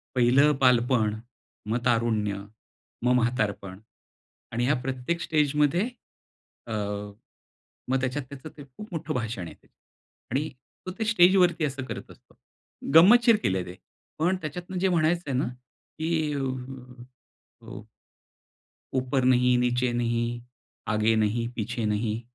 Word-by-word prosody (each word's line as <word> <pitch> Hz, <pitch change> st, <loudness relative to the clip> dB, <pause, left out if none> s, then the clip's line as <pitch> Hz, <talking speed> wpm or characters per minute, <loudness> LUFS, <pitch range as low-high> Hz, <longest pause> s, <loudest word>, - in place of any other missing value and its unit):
पहिलं 130 Hz, +4 st, +5 dB
बालपण, 120 Hz, -4 st, +3 dB, 0.5 s
मग 115 Hz, +2 st, -1 dB
तारुण्य, 115 Hz, -4 st, +1 dB, 0.7 s
मग 125 Hz, -, +4 dB
म्हातारपण 105 Hz, -6 st, -1 dB, 0.7 s
आणि 120 Hz, +1 st, 0 dB
ह्या 140 Hz, +4 st, +3 dB
प्रत्येक 130 Hz, +6 st, -3 dB
स्टेजमध्ये 150 Hz, -, +1 dB, 0.8 s
अ, 115 Hz, -, -6 dB, 1.2 s
मग 130 Hz, +1 st, +1 dB
त्याच्यात 130 Hz, +3 st, -2 dB
त्याचं 140 Hz, +2 st, -9 dB
ते 145 Hz, -, -10 dB
खूप 140 Hz, +11 st, -12 dB
मोठं 160 Hz, -1 st, -3 dB
भाषण 115 Hz, -6 st, -3 dB
आहे -, -, -11 dB
ते. -, -, -29 dB, 0.6 s
आणि 145 Hz, +6 st, -1 dB, 0.4 s
तो -, -, -3 dB
ते 220 Hz, -, 0 dB
स्टेजवरती 180 Hz, -5 st, +4 dB
असं 135 Hz, -2 st, -3 dB
करत -, -, -7 dB
असतो. -, -, -19 dB, 0.6 s
गंमतशीर 225 Hz, +7 st, +7 dB
केले 95 Hz, -1 st, 0 dB
ते. 90 Hz, -, -8 dB, 0.4 s
पण 175 Hz, +4 st, +2 dB
त्याच्यातनं 175 Hz, +4 st, -5 dB
जे 190 Hz, +2 st, +2 dB
म्हणायचंय 170 Hz, -3 st, +1 dB
ना, 130 Hz, -, +1 dB, 0.5 s
की 160 Hz, +1 st, -2 dB, 0.2 s
अ, 140 Hz, -, -2 dB, 1.3 s
ऊ -, -, -9 dB, 1.1 s
ऊपर 130 Hz, 0 st, 0 dB
नहीं 125 Hz, -1 st, +4 dB
नीचे 125 Hz, 0 st, +1 dB
नहीं, 120 Hz, 0 st, -1 dB, 0.5 s
आगे 110 Hz, +1 st, +2 dB
नहीं, 110 Hz, +2 st, 0 dB
पीछे 120 Hz, 0 st, -3 dB
नहीं, 105 Hz, +1 st, -1 dB
125 Hz, 125 wpm, -26 LUFS, 115-155 Hz, 1.3 s, गंमतशीर